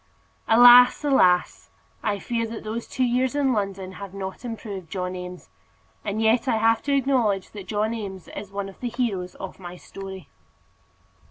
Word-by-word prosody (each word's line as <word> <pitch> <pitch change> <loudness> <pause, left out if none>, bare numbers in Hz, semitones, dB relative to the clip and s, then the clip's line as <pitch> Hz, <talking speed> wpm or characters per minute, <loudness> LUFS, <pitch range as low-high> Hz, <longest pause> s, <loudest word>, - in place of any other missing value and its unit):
Alas, 245 +4 +8
alas! 185 -11 +3 0.3
I 205 -1 -1
fear 230 +3 -2
that 225 0 -7
those 225 +2 -5
two 260 - -1
years 250 +2 +1
in 275 -3 +2
London 195 -3 -3
have 195 0 -9
not 190 +2 -6
improved 210 -7 -7
John 180 0 -3
Eames; 180 0 -9 0.5
and 210 +1 -3
yet 225 +3 +2
I 225 - +2
have 225 +1 +3
to 285 -1 +2
acknowledge 245 -8 +1
that 200 -3 -9
John 215 +2 -1
Eames 195 -6 -6
is 200 -1 -8
one 200 0 -4
of 195 - -13
the 245 - -3
heroes 210 -7 -2
of 190 - -8
my 180 -1 -9
story. 190 -3 -9
210 Hz, 170 wpm, -24 LUFS, 190-235 Hz, 0.5 s, Alas